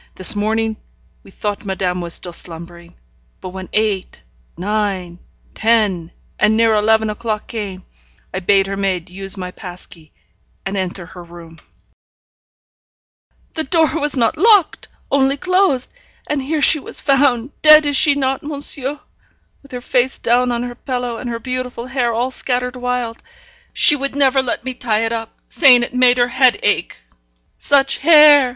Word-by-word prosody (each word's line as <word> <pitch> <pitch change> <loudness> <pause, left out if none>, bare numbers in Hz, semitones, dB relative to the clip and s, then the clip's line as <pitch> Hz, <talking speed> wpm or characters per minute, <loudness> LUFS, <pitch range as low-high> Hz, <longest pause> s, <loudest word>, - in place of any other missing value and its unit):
'This 190 +4 +1
morning 220 +1 -1 0.4
we - - -17
thought 205 +1 -5
madame 190 -2 -2
was 170 -1 -3
still 175 - -5
slumbering; 170 0 -8 0.4
but 185 - -8
when 190 0 -9
eight, 210 - -2 0.4
nine, 190 -2 -3 0.3
ten, 210 -7 +1 0.3
and 215 +1 +3
near 225 -1 +3
eleven 220 +1 +2
o'clock 215 0 -4
came, 200 -6 -7 0.5
I 185 - -2
bade 195 +1 +2
her 195 0 -4
maid 190 -3 -3
use 195 +1 -4
my 180 -1 -6
pass 180 -2 -10
key, 160 -3 -14 0.5
and 195 +1 -4
enter 185 -2 -4
her 180 0 -12
room 170 -1 -14 1.0
' - - -46
'The 315 - -2
door 325 +2 +1
was 290 -1 -1
not 255 +7 +1
locked, 410 -3 +3 0.2
only 275 0 +2
closed. 365 -6 +1 0.3
And 295 -2 -2
here 300 +3 -2
she 305 - +7
was - - -6
found 270 -2 +1
dead 305 0 +7
is 290 -1 0
she 285 +1 +5
not, 270 -1 -1
monsieur? 285 -1 -1 0.6
with 280 - -19
her 250 -1 -6
face 255 +1 0
down 245 +1 +1
on 240 0 -2
her 245 0 -6
pillow, 245 -1 -4
and 245 - -6
her 230 - -3
beautiful 250 0 -5
hair 255 -2 -1
all 240 +3 -2
scattered 250 -1 -3
wild; 250 -2 -4 0.5
she 340 -4 +4
never 275 -1 +1
would 260 - -2
let 240 - -3
me 260 +1 -4
tie 225 -3 -1
it 225 - -2
up, 225 -1 -6
saying 255 -6 +5
it 240 - -5
made 250 0 +4
her 245 0 +2
head 255 -1 +3
ache. 205 -4 0 0.6
Such 275 -1 +2
hair!' 300 -3 +6
235 Hz, 165 wpm, -17 LUFS, 195-270 Hz, 1.0 s, she